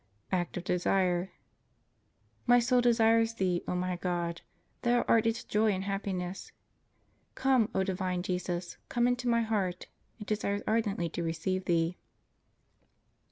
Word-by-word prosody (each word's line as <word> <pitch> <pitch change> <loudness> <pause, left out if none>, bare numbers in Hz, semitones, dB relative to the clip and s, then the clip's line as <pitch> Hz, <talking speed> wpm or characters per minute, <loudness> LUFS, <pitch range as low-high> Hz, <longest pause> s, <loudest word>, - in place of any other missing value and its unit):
Act 175 -2 -1
of 175 - -4
Desire. 180 0 +1 1.2
My 245 0 +7
soul 245 +1 +3
desires 230 -1 +3
Thee, 180 -3 0
O - - -1
my 180 0 -1
God! 175 -1 -2 0.4
Thou 240 0 +2
art 225 0 +3
its 225 0 -1
joy 215 +1 +2
and 190 0 -3
happiness. 195 -2 -4 0.8
Come, 260 -5 +3
O 190 - +3
divine 185 -1 -2
Jesus, 180 -1 -3
come 240 0 +2
into 245 0 0
my 235 -1 +3
heart; 195 -5 -1 0.3
it 210 - -7
desires 205 -1 -1
ardently 210 -6 0
to 170 - -4
receive 170 +3 -2
Thee. 170 +1 +1
190 Hz, 135 wpm, -30 LUFS, 180-225 Hz, 1.2 s, My